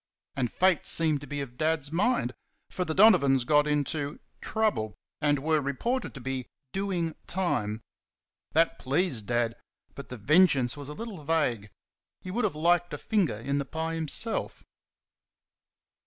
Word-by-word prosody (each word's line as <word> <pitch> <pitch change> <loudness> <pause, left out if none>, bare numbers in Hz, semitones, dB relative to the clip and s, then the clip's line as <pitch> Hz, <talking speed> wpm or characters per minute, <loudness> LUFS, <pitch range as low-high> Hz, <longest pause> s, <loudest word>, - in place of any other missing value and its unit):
And 125 -4 -1
Fate 185 -3 +2
seemed 155 -4 +3
to 145 - -9
be 145 -1 -4
of 125 -3 -8
Dad's 155 -2 0
mind; 180 - +1 0.4
for 180 - -2
the 160 -2 -3
Donovans 155 - +5
got 150 +3 +3
into 145 0 -1 0.2
"trouble,", 210 - -1 0.3
and 145 -1 +3
were 155 +2 +1
reported 235 - -2
to - - -7
be 130 0 -4 0.3
"doing 185 -4 -1
time." 115 - -1 0.7
That 165 +2 +2
pleased 135 - 0
Dad; 120 -1 0 0.4
but 140 - -10
the 125 - -6
vengeance 140 - +4
was 145 -1 -8
a - - -5
little 215 -7 -7
vague. 140 -9 0 0.5
He 185 - -8
would 225 +3 0
have 190 - -1
liked 175 +2 +2
a - - -6
finger 195 - 0
in 140 +5 -2
the 140 - -2
pie 160 +3 -3
himself. 165 +8 +1
150 Hz, 155 wpm, -28 LUFS, 135-175 Hz, 0.7 s, Donovans